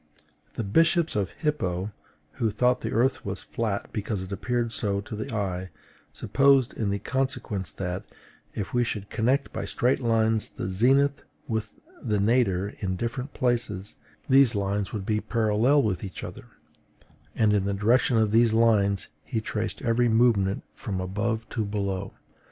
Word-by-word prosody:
The - - -2
bishop 165 - +3
of 100 -3 0
Hippo, 105 - -2 0.5
who 115 - +3
thought 125 +4 +2
the - - -3
earth 125 +4 +2
flat 100 +1 -4
because 105 -2 -2
it 95 - -9
appeared 120 +3 -1
so 100 -3 +1
to 110 +2 -7
the 110 +6 -5
eye, 95 -4 -2 0.4
supposed 135 -2 +3
in 100 -3 -1
consequence 130 -7 -2
that, 90 0 -4 0.5
if 100 - -4
we 120 0 +3
should 105 -4 -4
connect 130 +5 +1
by - - -3
straight 125 0 +1
lines 115 -2 +2
the - - -5
zenith 135 +8 +3 0.3
with 110 -3 -3 0.3
the 105 -4 0
nadir 100 -3 +2
in 95 -2 -2
different 125 +7 -4
places, 115 -6 -1 0.3
these 135 -4 +5
lines 100 0 -1
would 100 -3 -4
be 105 0 0
parallel 115 +5 +2
with 100 -5 -1
each 95 -2 -7
other; - - -8 0.9
and 110 -2 +3
in 100 -2 +2
the 100 - 0
direction 115 +4 +3
of 110 -2 +2
these 115 0 +4
lines 105 -4 +3 0.2
he 115 - -2
traced 110 0 -4
every 120 0 +2
movement 110 -4 +3
from 95 -3 -5
above 110 +5 -2
to 110 - -2
below. 100 -2 -3
110 Hz, 155 wpm, -26 LUFS, 100-120 Hz, 0.9 s, these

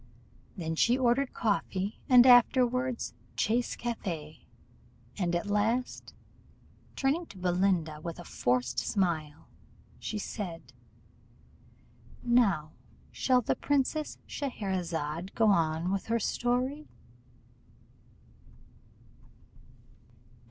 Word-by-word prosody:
Then 160 -3 -3
she 235 +9 +3
ordered 255 +1 +2
coffee, 200 -2 -1
and 250 -1 +8
afterward 250 0 +4 0.4
chasse 235 +3 0
café, 170 -10 -5 0.7
and 175 -3 -1
at 175 - -1
last, 215 +5 -1 0.8
turning 300 +5 0
to 200 - -13
Belinda, 180 -4 0
with 170 0 -6
a 175 - -8
forced 125 -5 0
smile, 160 -7 -2 0.5
she 215 - -4
said 190 -5 -6 1.5
"Now 215 -11 +2 0.4
shall 255 -1 +2
the - - 0
Princess 290 +2 -1
Scheherazade 185 - -3
go 225 -2 +4
on 165 -1 +1
with 195 -1 -2
her 230 +1 +1
story?" 250 +7 -1
205 Hz, 90 wpm, -30 LUFS, 170-245 Hz, 1.5 s, and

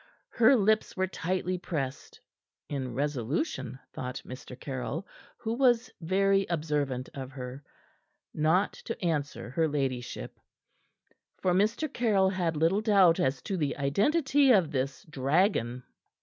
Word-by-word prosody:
Her 240 +3 +5
lips 215 -2 +2
were 190 - +2
tightly 185 0 -2
pressed 140 -7 -4 0.5
in 135 -3 -4
resolution, 140 - -2 0.2
thought 125 +1 -5
Mr. 125 0 -9
Caryll, 135 +7 -4 0.3
who 225 0 -3
was 240 -2 +3
very 195 +3 +2
observant 150 -6 -1
of 135 -2 -6
her 130 +1 -7 0.7
not 160 +6 +2 0.2
to 230 - -3
answer 145 -7 -2
her 160 +3 +2
ladyship; 130 - -3 1.0
for 180 - +1
Mr. 215 - +2
Caryll 205 -6 +3
had 175 -4 -1
little 165 +7 +2
doubt 195 -6 +5
as 130 -1 0
to 195 - -2
the 150 -4 -1
identity 265 - +3
of 185 -9 +4
this 135 -1 -2
dragon. 135 - +1
165 Hz, 125 wpm, -29 LUFS, 135-195 Hz, 1.0 s, Her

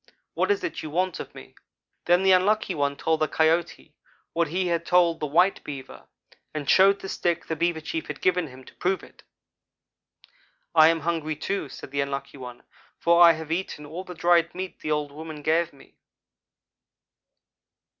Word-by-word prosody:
What - - 0
is 405 -2 +1
it 365 - -4
you 155 - -6
want 180 +3 -1
of - - -8
me?' - - -12 0.5
"Then 175 +2 +3
the 190 - +5
Unlucky 190 +2 +3
one 140 -3 -1
told 160 -1 0
the 155 - +2
Coyote 160 +2 0 0.4
what 170 0 +1
he 180 +5 -1
had 170 -1 0
told 170 -2 +3
the 150 - -2
white 180 +7 +2
Beaver, 135 -3 -9 0.5
and 145 -2 -4
showed 195 +4 +5
the - - -6
stick 175 -3 -1
the 160 - -3
Beaver 170 0 0
chief 160 +1 -4
had 150 - -6
given 180 -2 +1
him, 130 -1 -13
to - - -16
prove 185 +1 -1
it. - - -16 1.5
"'I 155 - +7
am 165 0 +3
hungry, 160 -1 -2
too,' 155 0 -3
said - - -10
the 140 0 0
Unlucky 140 0 -5
one, 125 -1 -10 0.3
'for 170 +1 +3
I 170 -1 +9
have 160 0 -7
eaten 165 -3 -3
all 165 +5 -7
the 180 -1 -10
dried 170 0 +2
meat 185 0 -6
the 155 - -5
old 150 -1 -1
woman 155 0 -9
gave 165 +2 +1
me.' 140 - -20
165 Hz, 185 wpm, -25 LUFS, 150-180 Hz, 1.5 s, I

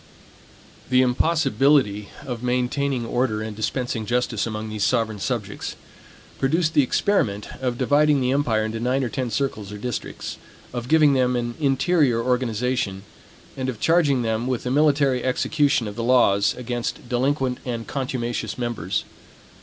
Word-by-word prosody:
The 130 0 +5
impossibility 135 -5 +2 0.2
of 120 -3 -5
maintaining 125 +1 0
order 115 -2 0
and 110 -1 -6
dispensing 115 0 -2
justice 120 -3 0
among 110 0 -4
these 105 -2 -3
sovereign 110 -2 +1
subjects, 105 -3 -3 0.6
produced 160 +4 +1
the 145 - +5
experiment 120 - 0
of 125 -2 -1
dividing 145 +3 +3
the 125 -1 +1
empire 120 -6 +1
into 110 +1 -3
nine 130 +3 0
or 125 - -1
ten 130 -1 -2
circles 110 -5 -2
or 105 - -6
districts; 120 +2 -5 0.4
of 120 -1 -4
giving 155 -1 +5
them 125 -1 +2
an 120 -1 -2
interior 140 -3 +2
organization, 125 -4 -1 0.5
and 130 -1 -2
of 120 -4 -5
charging 150 -6 +3
them 115 +1 -1
with 130 -2 -1
the 125 - -2
military 140 -3 +3
execution 135 -1 +1
of 105 - -6
the 115 - -3
laws 105 -5 +3
against 120 0 -4
delinquent 130 +1 0
and 115 -3 -4
contumacious 125 -3 -3
members. 115 -6 -2
125 Hz, 145 wpm, -23 LUFS, 115-135 Hz, 0.6 s, The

